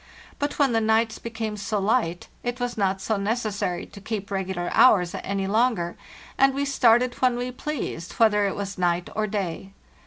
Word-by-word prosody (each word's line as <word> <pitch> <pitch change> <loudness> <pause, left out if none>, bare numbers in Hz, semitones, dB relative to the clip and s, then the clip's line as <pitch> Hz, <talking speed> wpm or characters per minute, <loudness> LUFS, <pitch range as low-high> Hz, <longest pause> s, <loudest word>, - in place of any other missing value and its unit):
But 285 0 -2
when 280 -3 +3
the 225 -1 +2
nights 220 +1 +2
became 225 -2 -4
so 210 +1 -2
light, 200 -4 0
it 245 +1 -3
was 245 -1 -2
not 195 -2 0
so 220 +1 0
necessary 205 -4 -2
to 200 - -13
keep 205 -1 -5
regular 190 -2 -2
hours 180 -8 +5
any 195 0 -2
longer, 215 -4 +1 0.4
and 270 0 +5
we 280 +1 0
started 245 -2 +4
when 255 -1 +3
we 245 +1 -3
pleased, 250 - -5
whether 210 -3 +3
it 195 - -3
was 200 -1 -5
night 175 0 0
or 215 0 0
day. 195 -2 -4
215 Hz, 180 wpm, -25 LUFS, 195-240 Hz, 0.4 s, hours